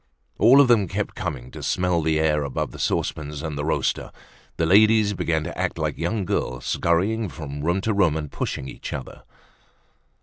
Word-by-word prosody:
All 135 Hz, +4 st, +7 dB
of 140 Hz, -, +7 dB
them 110 Hz, -5 st, +4 dB
kept -, -, -3 dB
coming 65 Hz, -4 st, -5 dB
to -, -, -9 dB
smell 90 Hz, -2 st, +1 dB
the 80 Hz, 0 st, +1 dB
air 75 Hz, -1 st, +2 dB
above 70 Hz, -, -3 dB
the -, -, -11 dB
saucepans 75 Hz, -1 st, -2 dB
and 80 Hz, -2 st, -4 dB
the 75 Hz, -, -3 dB
roaster. -, -, -1 dB, 0.5 s
The 80 Hz, -, +1 dB
ladies 105 Hz, +3 st, +5 dB
began 80 Hz, -4 st, -1 dB
to 85 Hz, -, -6 dB
act 95 Hz, -1 st, -2 dB
like 75 Hz, -2 st, -2 dB
young 95 Hz, +4 st, -1 dB
girls, 65 Hz, -6 st, -2 dB
scurrying 100 Hz, +6 st, +1 dB
from 75 Hz, -4 st, -7 dB
room 85 Hz, +5 st, 0 dB
to 110 Hz, +2 st, 0 dB
room 90 Hz, -6 st, +2 dB
and 75 Hz, -2 st, -5 dB
pushing 70 Hz, -, -4 dB
each -, -, -7 dB
other. 65 Hz, -, -7 dB
85 Hz, 190 wpm, -23 LUFS, 75-100 Hz, 0.5 s, All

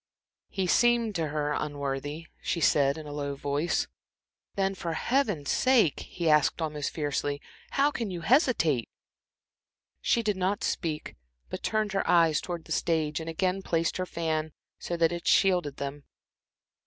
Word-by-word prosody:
"He 190 Hz, -, -1 dB
seemed 235 Hz, +3 st, +3 dB
to 165 Hz, -4 st, -1 dB
her 150 Hz, 0 st, -1 dB
unworthy," 145 Hz, +1 st, -3 dB, 0.2 s
she 170 Hz, -, -1 dB
said, 140 Hz, -2 st, +3 dB
in 155 Hz, -, -8 dB
a 145 Hz, -, -7 dB
low 140 Hz, -1 st, -3 dB
voice. 145 Hz, +4 st, 0 dB, 0.7 s
"Then, 195 Hz, 0 st, +1 dB
for 170 Hz, -3 st, -4 dB
Heaven's 205 Hz, -, 0 dB
sake," 250 Hz, -, +3 dB
he 170 Hz, -2 st, -4 dB
asked, 150 Hz, +1 st, +4 dB
almost 150 Hz, -3 st, -2 dB
fiercely, 145 Hz, -1 st, -2 dB, 0.4 s
"how 285 Hz, +2 st, +4 dB
can 230 Hz, -7 st, -3 dB
you 175 Hz, -2 st, -5 dB
hesitate?" 165 Hz, -, +3 dB, 1.1 s
She 235 Hz, -, +2 dB
did 210 Hz, -3 st, 0 dB
not 190 Hz, +2 st, 0 dB
speak, 155 Hz, -4 st, -2 dB, 0.4 s
but -, -, -4 dB
turned 215 Hz, -2 st, 0 dB
her 195 Hz, -, -1 dB
eyes 165 Hz, -3 st, +4 dB
towards 175 Hz, -2 st, -5 dB
the -, -, -13 dB
stage 155 Hz, -2 st, 0 dB
and 160 Hz, 0 st, -5 dB
again 185 Hz, +3 st, 0 dB
placed 165 Hz, -2 st, 0 dB
her 185 Hz, 0 st, -2 dB
fan 160 Hz, -2 st, -2 dB, 0.3 s
so 175 Hz, -, -3 dB
that 165 Hz, 0 st, +3 dB
it 170 Hz, 0 st, -5 dB
shielded 180 Hz, -7 st, +3 dB
them. 140 Hz, +1 st, -5 dB
165 Hz, 155 wpm, -28 LUFS, 150-190 Hz, 1.1 s, asked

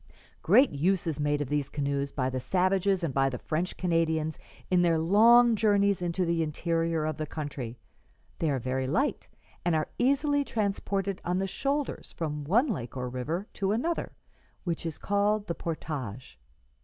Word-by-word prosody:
"'Great 270 Hz, +2 st, +5 dB
use 175 Hz, +6 st, +1 dB
is 155 Hz, -3 st, -2 dB
made 145 Hz, 0 st, +1 dB
of 140 Hz, -, -3 dB
these 145 Hz, -2 st, -1 dB
canoes 140 Hz, -1 st, -2 dB
by 130 Hz, -3 st, -1 dB
the 130 Hz, 0 st, -2 dB
savages 185 Hz, +4 st, +1 dB
and 155 Hz, -5 st, -1 dB
by 135 Hz, 0 st, +3 dB
the 125 Hz, -, -4 dB
French 165 Hz, +8 st, -3 dB
Canadians 160 Hz, -3 st, 0 dB, 0.3 s
in 180 Hz, -1 st, +4 dB
their 170 Hz, -2 st, +3 dB
long 225 Hz, +8 st, +6 dB
journeys 200 Hz, -2 st, +2 dB
into 175 Hz, +1 st, 0 dB
the 170 Hz, -1 st, +1 dB
interior 165 Hz, 0 st, 0 dB
of 155 Hz, -1 st, -2 dB
the 155 Hz, -1 st, -3 dB
country; 140 Hz, -6 st, -5 dB, 0.6 s
they 160 Hz, -, +1 dB
are 140 Hz, -, +1 dB
very 130 Hz, +1 st, -2 dB
light, 265 Hz, -, 0 dB, 0.4 s
and 175 Hz, -2 st, +2 dB
are 155 Hz, -, 0 dB
easily 285 Hz, +3 st, +2 dB
transported 200 Hz, -4 st, -2 dB
on 175 Hz, +1 st, 0 dB
the 190 Hz, -, 0 dB
shoulders 275 Hz, +8 st, -2 dB
from 150 Hz, -3 st, -3 dB
one 220 Hz, -, +4 dB
lake 135 Hz, -, -4 dB
or 125 Hz, 0 st, -3 dB
river 150 Hz, +10 st, -3 dB
to 195 Hz, 0 st, 0 dB
another, 325 Hz, +10 st, -2 dB, 0.5 s
which 170 Hz, -2 st, -3 dB
is 160 Hz, -, -5 dB
called 205 Hz, +1 st, +1 dB
the 170 Hz, -, -2 dB
portage. 135 Hz, -, -5 dB
165 Hz, 170 wpm, -28 LUFS, 145-200 Hz, 0.6 s, long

